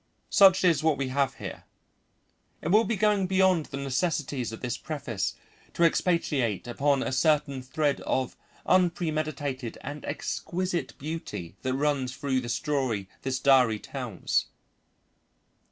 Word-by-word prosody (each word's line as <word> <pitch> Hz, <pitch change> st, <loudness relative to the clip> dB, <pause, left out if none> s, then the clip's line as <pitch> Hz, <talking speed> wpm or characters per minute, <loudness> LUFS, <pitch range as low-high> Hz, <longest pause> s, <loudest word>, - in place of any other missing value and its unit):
Such 190 Hz, -2 st, +6 dB
is 170 Hz, -3 st, +4 dB
what 155 Hz, -2 st, +2 dB
we 135 Hz, -2 st, -2 dB
have 135 Hz, 0 st, 0 dB
here. -, -, -8 dB, 1.0 s
It 160 Hz, -, -1 dB
will 215 Hz, +5 st, +5 dB
be 230 Hz, -, 0 dB
going 205 Hz, -1 st, +2 dB
beyond 185 Hz, -4 st, +3 dB
the 135 Hz, -, -6 dB
necessities 135 Hz, -2 st, -1 dB
of 110 Hz, -, -8 dB
this 125 Hz, -2 st, -2 dB
preface 135 Hz, -10 st, -3 dB, 0.4 s
to 170 Hz, -, +2 dB
expatiate 150 Hz, -, +1 dB
upon 135 Hz, +3 st, +1 dB
a -, -, -2 dB
certain 140 Hz, -1 st, +2 dB
thread 140 Hz, +2 st, -1 dB
of 130 Hz, -1 st, -1 dB, 0.3 s
unpremeditated 155 Hz, -8 st, 0 dB
and 145 Hz, +1 st, -7 dB
exquisite 175 Hz, +4 st, -3 dB
beauty 140 Hz, -, -6 dB
that 130 Hz, 0 st, -1 dB
runs 135 Hz, -3 st, 0 dB
through 140 Hz, -2 st, 0 dB
the 120 Hz, -, -6 dB
story 130 Hz, -, -1 dB
this 130 Hz, -1 st, -1 dB
diary 130 Hz, -5 st, +4 dB
tells. 120 Hz, -5 st, -2 dB
140 Hz, 135 wpm, -27 LUFS, 130-165 Hz, 1.0 s, Such